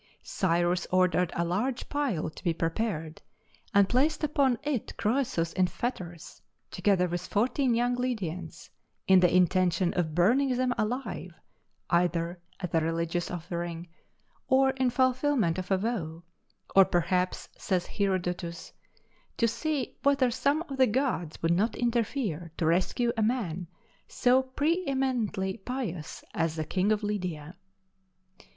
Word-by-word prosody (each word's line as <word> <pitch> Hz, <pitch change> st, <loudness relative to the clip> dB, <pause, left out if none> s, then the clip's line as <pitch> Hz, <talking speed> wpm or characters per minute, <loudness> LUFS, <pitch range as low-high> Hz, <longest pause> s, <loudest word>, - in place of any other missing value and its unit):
Cyrus 175 Hz, 0 st, 0 dB
ordered 180 Hz, -1 st, +2 dB
a 170 Hz, -, 0 dB
large 220 Hz, +9 st, -1 dB
pile 265 Hz, -, -1 dB
to -, -, -13 dB
be 170 Hz, -3 st, +1 dB
prepared, 165 Hz, -2 st, -2 dB, 0.5 s
and 200 Hz, -3 st, +5 dB
placed 295 Hz, +7 st, +1 dB
upon 275 Hz, -4 st, +2 dB
it 285 Hz, -6 st, -3 dB
Croesus 215 Hz, -8 st, 0 dB
in 185 Hz, -1 st, +2 dB
fetters, 180 Hz, -6 st, -5 dB, 0.3 s
together 190 Hz, -3 st, +2 dB
with 175 Hz, 0 st, -4 dB
fourteen 245 Hz, +3 st, +1 dB
young 245 Hz, +1 st, +1 dB
Lydians, 185 Hz, -9 st, -4 dB, 0.3 s
in 190 Hz, -1 st, +6 dB
the 180 Hz, -1 st, +4 dB
intention 180 Hz, 0 st, +3 dB
of 160 Hz, -4 st, -1 dB
burning 250 Hz, +9 st, +3 dB
them 255 Hz, -1 st, +1 dB
alive 215 Hz, -6 st, -3 dB, 0.6 s
either 175 Hz, 0 st, +1 dB, 0.2 s
as 180 Hz, -3 st, -5 dB
a 165 Hz, -, +4 dB
religious 165 Hz, +2 st, -1 dB
offering, 170 Hz, -1 st, -5 dB, 0.6 s
or 265 Hz, 0 st, +4 dB
in 260 Hz, -1 st, +1 dB
fulfilment 255 Hz, -, +2 dB
of 185 Hz, -, -6 dB
a 190 Hz, -, +3 dB
vow, 180 Hz, -6 st, -3 dB, 0.5 s
"or 195 Hz, -, +9 dB
perhaps 180 Hz, +1 st, 0 dB
(says 185 Hz, -2 st, -1 dB
Herodotus) 180 Hz, -3 st, -2 dB, 0.6 s
to 230 Hz, -, +3 dB
see 270 Hz, +4 st, -2 dB
whether 275 Hz, -3 st, +3 dB
some 280 Hz, +6 st, +1 dB
of 275 Hz, -5 st, -7 dB
the 260 Hz, -1 st, +5 dB
gods 220 Hz, -, -1 dB
would 165 Hz, +1 st, +3 dB
not 210 Hz, +6 st, +1 dB
interfere 230 Hz, -, -1 dB
to 165 Hz, -, 0 dB
rescue 185 Hz, +8 st, +1 dB
a 225 Hz, -, 0 dB
man 200 Hz, -7 st, -1 dB, 0.4 s
so 255 Hz, +1 st, +3 dB
preëmiently 260 Hz, -, -1 dB
pious 215 Hz, -, -5 dB
as 165 Hz, -1 st, 0 dB
the 155 Hz, -1 st, -3 dB
king 190 Hz, +6 st, +1 dB
of 215 Hz, 0 st, +1 dB
Lydia." 180 Hz, -6 st, -3 dB
195 Hz, 135 wpm, -28 LUFS, 175-250 Hz, 0.6 s, or